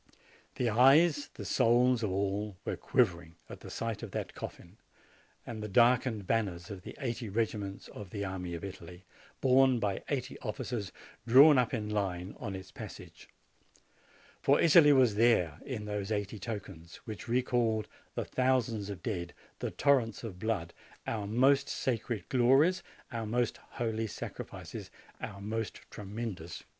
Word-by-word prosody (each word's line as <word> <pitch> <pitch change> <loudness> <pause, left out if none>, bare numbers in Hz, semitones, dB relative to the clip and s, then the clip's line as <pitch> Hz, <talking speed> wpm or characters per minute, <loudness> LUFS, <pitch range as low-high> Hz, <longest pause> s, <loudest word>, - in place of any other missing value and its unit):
The 125 - 0
eyes, 140 +6 +5
the 105 - -7
souls, 120 +5 +3
of 110 - 0
all 100 +1 -1
were - - -1
quivering 85 -9 0
at - - -9
the - - -10
sight 115 -2 -3
of - - -6
that - - -4
coffin - - -9 0.7
and 115 -2 -6
the 105 - -4
darkened 120 0 +3
banners 95 -5 -1
of 95 -2 -7
the - - -10
eighty 120 -4 -3
regiments 105 -2 -2
of 100 -3 -9
the 100 +2 -4
army 90 -2 -4
of 85 - -7
Italy, 90 -1 -9 0.4
borne 130 -1 +5
by 100 -3 -1
eighty 130 -3 -3
officers, 105 -2 -4 0.4
drawn 135 +4 +8
up 125 - +1
in 110 -4 -2
line 95 -3 -2
on 100 -6 -4
its 95 -1 -9
passage: - - -10 1.1
for 140 +1 +4
Italy 160 -2 +7
was 130 -5 +5
there 100 -8 +3
in 115 -6 -5
those 105 0 -3
eighty 105 0 -2
tokens, 95 -6 -7
which 110 +1 -7
recalled 120 -3 +1 0.3
the - - -2
thousands 120 -5 0
of 100 -3 -7
dead, 90 -7 -3 0.2
the - - -2
torrents 125 -7 +2
of 100 -6 -7
blood, 95 -6 -2 0.3
our 105 -3 -2
most 135 +5 +3
sacred 115 -3 -2
glories, 135 +8 +4 0.3
our 115 -2 -3
most 120 +1 0
holy 115 -1 -3
sacrifices, - - -7 0.3
our 100 - -6
most 110 +2 -4
tremendous 100 -5 -6
griefs. - - -10
110 Hz, 150 wpm, -31 LUFS, 100-125 Hz, 1.1 s, drawn